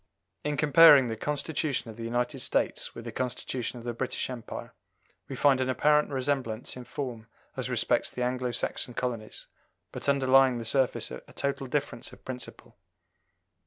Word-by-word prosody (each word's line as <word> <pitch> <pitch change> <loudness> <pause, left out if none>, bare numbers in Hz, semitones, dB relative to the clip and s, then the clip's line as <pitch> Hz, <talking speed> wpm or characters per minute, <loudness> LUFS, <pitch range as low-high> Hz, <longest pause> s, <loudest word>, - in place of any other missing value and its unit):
In 150 0 -1
comparing 145 -3 +7
the 110 - -2
Constitution 145 -1 -2
of - - -12
the 115 - -7
United 120 +1 -1
States - - -1
with - - -8
the - - -5
Constitution 125 -1 -3
of 120 - -9
the 120 - -2
British 130 +2 -2
Empire, 120 -3 -7 0.6
we - - -4
find 135 -2 +4
an 130 - 0
apparent 150 +3 +3
resemblance 130 -4 -2
in 125 -1 -8
form 120 -6 -5 0.3
as - - -3
respects - - +1
the 125 - -3
Anglo 125 0 -1
Saxon 120 0 -2
colonies, 115 -4 -4 0.5
but - - -3
underlying 135 -2 +5
the 115 - -5
surface 130 - +1
a 65 - -7
total 140 -1 -2
difference 135 -3 -3
of - - -16
principle. 125 -1 -8
130 Hz, 160 wpm, -28 LUFS, 120-140 Hz, 0.6 s, comparing